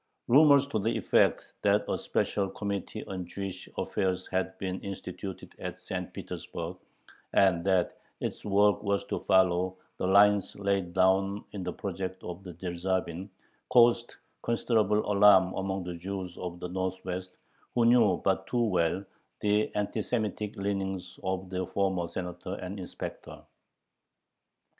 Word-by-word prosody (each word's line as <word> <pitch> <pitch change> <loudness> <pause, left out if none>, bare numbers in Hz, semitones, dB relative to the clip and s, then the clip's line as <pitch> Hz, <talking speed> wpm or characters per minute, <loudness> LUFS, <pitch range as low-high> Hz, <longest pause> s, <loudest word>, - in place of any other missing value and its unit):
Rumors 140 +1 +7
to 110 - 0
the 110 +3 0
effect - - +3 0.2
that - - +3
a - - 0
special 100 -2 0
Committee 100 +2 -4
on 95 -2 -4
Jewish 95 +1 -6
affairs 95 -1 -1
had 95 0 -2
been 95 -1 -3
instituted 95 -1 -7
at - - -5
St. - - -5
Petersburg, - - -6 0.6
and 90 -4 +4
that 95 -2 +1 0.2
its - - -4
work 105 0 +3
was 100 -1 0
to - - -3
follow 95 -1 +3 0.2
the - - -1
lines 100 +1 +5
laid 100 -3 -1
down 95 +2 +2
in 100 - -5
the 90 0 -3
project 95 0 -5
of 90 +1 -6
Dyerzhavin, 90 +1 -3 0.4
caused 120 -1 +5 0.3
considerable 110 -3 +2
alarm 100 -2 +6
among 95 0 -2
the 90 0 -5
Jews 95 0 -5
of 90 -1 -6
the 90 - -4
Northwest, 95 0 -4 0.4
who 120 -1 +4
knew 115 -6 +5
but 95 0 +1
too 120 -1 +1
well 95 -2 +1 0.4
the 105 +1 +2
anti 105 +1 -1
Semitic 105 -2 -2
leanings 95 -2 -3
of 95 0 -2
the 90 -1 -2
former 95 -3 0
Senator 90 +1 -5
and 95 +1 -6
inspector. 90 - -7
95 Hz, 140 wpm, -29 LUFS, 90-105 Hz, 0.6 s, Rumors